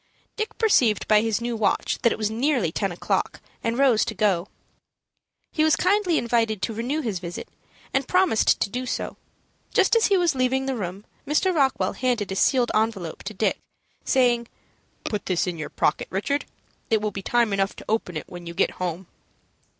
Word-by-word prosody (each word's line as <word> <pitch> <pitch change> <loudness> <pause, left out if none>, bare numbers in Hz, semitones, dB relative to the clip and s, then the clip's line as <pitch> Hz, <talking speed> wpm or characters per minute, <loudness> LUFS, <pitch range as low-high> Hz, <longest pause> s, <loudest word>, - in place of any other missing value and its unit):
Dick 435 0 -4
perceived 250 - +3
by 210 -1 +5
his 225 0 0
new 235 0 -2
watch 220 -2 0
that 235 - +4
it - - -2
was 215 -1 -1
nearly 240 - +1
ten 195 +2 -1
o'clock, 175 - -2 0.2
and 230 +1 -1
rose 260 -5 +4
to 220 - -4
go. 195 -3 +1 1.0
He 310 - +1
was 315 -1 +4
kindly 370 -3 +2
invited 225 -3 +1
to 225 - -1
renew 250 +8 -2
his 215 - -2
visit, 175 0 -7 0.5
and 270 0 0
promised 365 - +3
to - - +1
do 250 +1 -3
so. - - -3 0.6
Just - - +4
as 460 - +4
he 395 - +3
was 345 -3 +2
leaving 260 0 +1
the 270 -1 -1
room, 195 -1 -5 0.2
Mr. 335 +6 +2
Rockwell 275 -5 +1
handed 240 -6 -1
a - - -2
sealed 245 +4 +3
envelope 215 -6 -1
to 215 - -7
Dick, 215 - 0 0.4
saying, 240 -3 +2 0.6
"Put 210 -2 -3
this 185 -3 +1
in 175 -3 -4
your 150 - -4
pocket, 150 - 0
Richard. 280 +10 -1 0.4
It 220 - +3
will 210 0 -2
be 195 - -6
time 235 +1 +1
enough 195 0 0
to - - -11
open 210 -6 -1
it - - -6
when 175 -1 -9
you 170 - -7
get - - +2
home." 180 +1 -3
225 Hz, 190 wpm, -24 LUFS, 195-265 Hz, 1.0 s, by